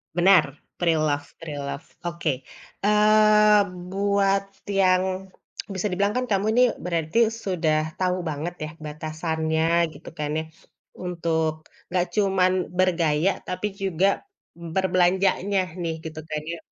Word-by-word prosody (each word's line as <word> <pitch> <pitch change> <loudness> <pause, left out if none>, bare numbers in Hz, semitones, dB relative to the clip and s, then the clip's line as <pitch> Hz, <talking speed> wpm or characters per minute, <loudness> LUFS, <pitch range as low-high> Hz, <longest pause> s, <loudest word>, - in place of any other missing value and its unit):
Benar 180 -1 +6 0.3
preloved 155 -4 0
preloved. 145 -2 -6 0.2
Oke, 170 -7 -2 0.4
eee, 210 0 +5 0.3
buat 195 0 +2 0.2
yang 190 -1 +2 0.4
bisa 195 +1 -2
dibilang 200 +3 +1
kan, 250 0 0
kamu 195 0 +2
ini 250 +2 +5 0.2
berarti 175 +6 +1
sudah 160 -8 0
tahu 185 0 0
banget 155 +4 -4
ya 155 - -4
batasannya, 160 +2 0
gitu 145 - -11
kan 150 -2 -3
ya - - -3 0.5
untuk, 160 -3 -2 0.3
enggak 180 -1 +2
cuman 190 -3 +3 0.3
bergaya, 170 -2 +2 0.2
tapi 185 +3 -2
juga 195 -2 +1 0.5
berbelanjanya 185 +3 +1 0.2
nih, 165 -1 -2
gitu 155 -1 -6
kan 155 0 -2
ya. - - -5
180 Hz, 115 wpm, -24 LUFS, 160-195 Hz, 0.5 s, Benar